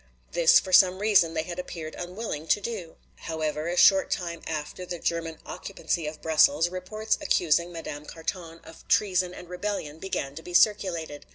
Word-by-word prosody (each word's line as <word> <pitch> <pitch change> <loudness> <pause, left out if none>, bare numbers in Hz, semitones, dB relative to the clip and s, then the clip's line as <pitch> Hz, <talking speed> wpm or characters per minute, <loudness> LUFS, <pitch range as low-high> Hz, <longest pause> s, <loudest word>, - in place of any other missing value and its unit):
This 170 -1 +6
for 185 - -7
some 185 0 +7
reason 195 -5 +3
they 160 - 0
had 175 +1 -6
appeared 160 -3 -6
unwilling 175 -3 -5
to - - +3
do. 200 -6 -6 0.2
However, 155 -1 -3
a 175 +1 -2
short 195 0 +6
time 170 -2 -3
after 155 +3 -5
the 180 -1 -5
German 165 -1 -2
occupancy 175 -4 -3
of 155 0 -8
Brussels, 160 +1 +4
reports 215 +5 -2
accusing 170 +1 +2
Madame 150 -3 -7
Carton 165 0 -6
of 160 - -15
treason 185 -3 +2
and 180 - -10
rebellion 180 -4 -4
began 150 -7 -3
to 160 - -8
be 175 +1 -7
circulated. 170 -8 +2
170 Hz, 170 wpm, -27 LUFS, 160-185 Hz, 0.2 s, some